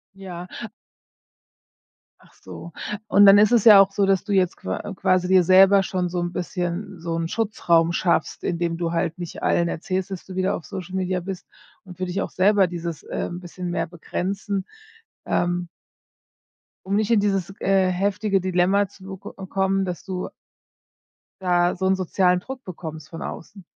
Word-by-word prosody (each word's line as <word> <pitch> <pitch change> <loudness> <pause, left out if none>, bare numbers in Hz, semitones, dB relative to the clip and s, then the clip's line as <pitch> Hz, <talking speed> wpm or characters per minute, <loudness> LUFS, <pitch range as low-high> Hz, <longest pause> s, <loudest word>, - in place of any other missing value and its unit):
Ja. 180 -2 -8 1.7
Ach - - -23
so, 170 - -10 0.4
und 205 0 +6
dann 195 0 +9
ist 210 +2 +5
es 235 -3 +3
ja 210 -3 +10
auch 195 0 +2
so, 200 0 +1
dass 195 -1 +2
du 205 - -6
jetzt 185 -3 +2
qua 95 0 -4 0.2
quasi 185 0 +1
dir 185 -1 +5
selber 195 +2 +6
schon 185 -2 -2
so 175 0 -2
'n 175 0 -2
bisschen 180 +1 -4
so 165 0 -3
'n 165 0 -1
Schutzraum 170 -5 +1
schaffst, 170 0 0
indem 170 -1 -1
du 170 -1 -2
halt 165 -1 -1
nicht 175 -2 -7
allen 170 - +2
erzählst, 185 +3 -3
dass 190 - -6
du 190 - -9
wieder 185 0 0
auf - - -7
Social 185 -2 -7
Media 185 -1 -1
bist 185 +1 -7 0.4
und 180 -4 -12
für 185 - -2
dich 180 +2 -2
auch - - -3
selber 195 0 +3
dieses, 170 -2 -6
ähm, 175 - -3
bisschen 180 0 -6
mehr 175 - -1
begrenzen, 190 +3 -4 0.6
ähm 175 0 0 1.2
Um 195 - 0
nicht 215 0 0
in 230 -3 +4
dieses 195 -2 0
äh, 190 -1 +3
heftige 195 +2 0
Dilemma 185 +2 +2
zu 190 0 -17
beko 195 +1 -8 0.2
kommen, 195 0 0
dass 180 -3 -6
du 185 -1 -4 1.1
da 175 -1 +2
so 190 - -2
'n 190 - +3
sozialen 185 -1 +2
Druck 260 +3 -8
bekommst 160 -4 -8
von 165 - -8
außen. 195 +2 -8
185 Hz, 175 wpm, -23 LUFS, 175-195 Hz, 1.7 s, ja